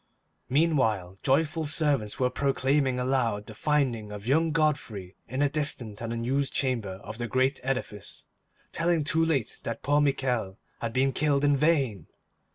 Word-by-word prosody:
Meanwhile 125 - +1
joyful 155 +3 +1
servants 145 -9 0
were 125 -1 +2
proclaiming 135 0 +1
aloud 125 -5 0
the 110 - -9
finding 125 -5 0
of 105 0 -8
young 160 +6 +3
Godfrey 145 - -1
in 130 +4 -1
a - - +4
distant 140 -8 -2
and 115 -1 -3
unused 130 +4 -1
chamber 115 -8 -1
of 105 +4 -8
the 120 - -2
great 130 +3 +1
edifice, 125 -6 -4 0.5
telling 165 -1 +1
too 160 +2 +2
late 150 -8 0
that 115 - -5
poor 145 +1 +3
Michel 125 -8 0 0.2
had 115 - -3
been 135 +1 +2
killed 145 0 +1
in 145 0 +4
vain. 135 - +1
130 Hz, 155 wpm, -28 LUFS, 115-145 Hz, 0.5 s, a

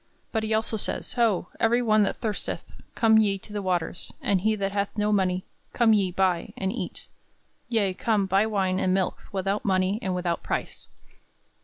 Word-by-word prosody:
But 220 - 0
he 220 0 -3
also 220 0 +1
says, - - -3
"Ho, 225 -7 +1
every 235 +2 +3
one 215 -2 +4
that 200 - +1
thirsteth, 215 -3 -3 0.3
come 220 -1 +5
ye 200 -2 +2
to 205 +2 -12
the 205 - -2
waters, 180 -1 -2
and 190 -3 +1
he 215 +2 +2
that 200 -1 -2
hath 200 0 0
no 210 0 +1
money; 185 -2 +1 0.3
come 230 -2 +4
ye, 195 -3 +2
buy, 180 -2 0
and 190 +1 -1
eat; - - -6 0.6
yea, 210 -5 +1
come, 210 0 +1
buy 195 +3 +2
wine 190 -3 0
and 185 -1 +2
milk 190 -1 0
without 195 +1 -1
money 190 +1 +1
and 185 -1 -1
without 175 -2 -1
price." - - -4
200 Hz, 185 wpm, -26 LUFS, 185-220 Hz, 0.6 s, come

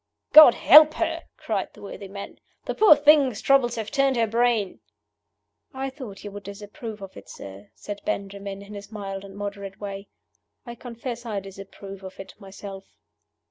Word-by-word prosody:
"God 305 -6 +10
help 305 +1 +7
her!" - - -2 0.2
cried - - -4
the - - -15
worthy 200 0 -8
man. 200 +1 -9 0.3
"The - - -3
poor 420 -7 +7
thing's 290 -6 +4
troubles 260 -3 +2
have 220 -2 -5
turned 275 -1 +2
her 230 -1 +2
brain!" 230 -3 0 1.0
"I 270 0 -4
thought 255 -8 -10
you 205 - -7
would 205 0 -8
disapprove 205 +2 -9
of 195 - -11
it, - - -13
sir," 100 +1 -11
said 205 -1 -8
Benjamin, 200 0 -5
in 205 +1 -12
his 200 +1 -10
mild 195 -2 -6
and 195 0 -12
moderate 200 -1 -7
way. 200 -1 -7 0.6
"I 235 - -7
confess 235 0 -7
I 215 -4 -3
disapprove 195 0 -11
of 190 0 -10
it 195 0 -10
myself." 195 -1 -11
205 Hz, 170 wpm, -24 LUFS, 195-240 Hz, 1.0 s, God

